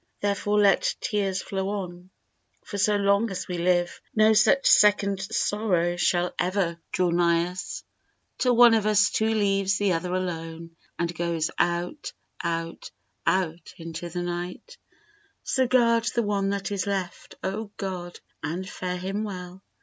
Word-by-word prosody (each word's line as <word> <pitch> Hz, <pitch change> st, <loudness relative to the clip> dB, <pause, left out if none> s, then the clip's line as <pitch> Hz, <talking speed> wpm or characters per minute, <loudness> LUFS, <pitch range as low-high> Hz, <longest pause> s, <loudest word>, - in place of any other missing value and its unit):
Therefore 205 Hz, +1 st, 0 dB
let 200 Hz, -1 st, +3 dB
tears 195 Hz, -2 st, -1 dB
flow 195 Hz, 0 st, -3 dB
on, 180 Hz, -3 st, -5 dB, 0.6 s
for 200 Hz, -, -5 dB
so 205 Hz, +1 st, +3 dB
long 200 Hz, +2 st, +2 dB
as 185 Hz, -2 st, -5 dB
we 180 Hz, -1 st, -3 dB
live 175 Hz, 0 st, +1 dB
No 215 Hz, 0 st, +5 dB
such 245 Hz, +6 st, +4 dB
second 200 Hz, -1 st, +5 dB
sorrow 190 Hz, -4 st, 0 dB
shall 175 Hz, 0 st, +1 dB
ever 175 Hz, -2 st, 0 dB
draw 180 Hz, -1 st, +1 dB
nigh 170 Hz, 0 st, +2 dB
us, 185 Hz, -, -6 dB, 0.6 s
Till 250 Hz, -1 st, +3 dB
one 240 Hz, -1 st, +8 dB
of 215 Hz, -2 st, +2 dB
us 205 Hz, -1 st, +4 dB
two 220 Hz, 0 st, +1 dB
leaves 195 Hz, -2 st, +1 dB
the 200 Hz, -2 st, +2 dB
other 170 Hz, +2 st, -2 dB
alone 165 Hz, -2 st, -5 dB, 0.2 s
And 170 Hz, 0 st, -1 dB
goes 170 Hz, -1 st, -1 dB
out, 175 Hz, -, -1 dB, 0.3 s
out, 165 Hz, -1 st, -3 dB, 0.4 s
out 175 Hz, -3 st, -1 dB
into 165 Hz, +1 st, -6 dB
the 175 Hz, +1 st, -4 dB
night, 175 Hz, -, -6 dB, 0.6 s
So 260 Hz, -1 st, +1 dB
guard 235 Hz, -2 st, +3 dB
the 235 Hz, -, +2 dB
one 200 Hz, -1 st, 0 dB
that 200 Hz, 0 st, -3 dB
is 200 Hz, -1 st, -2 dB
left, 190 Hz, -3 st, -4 dB
O 205 Hz, +3 st, -3 dB
God, 180 Hz, -3 st, -5 dB, 0.2 s
and 170 Hz, +6 st, -4 dB
fare 180 Hz, -1 st, -4 dB
him 195 Hz, +4 st, -3 dB
well! 185 Hz, -2 st, -7 dB
190 Hz, 150 wpm, -26 LUFS, 175-205 Hz, 0.6 s, one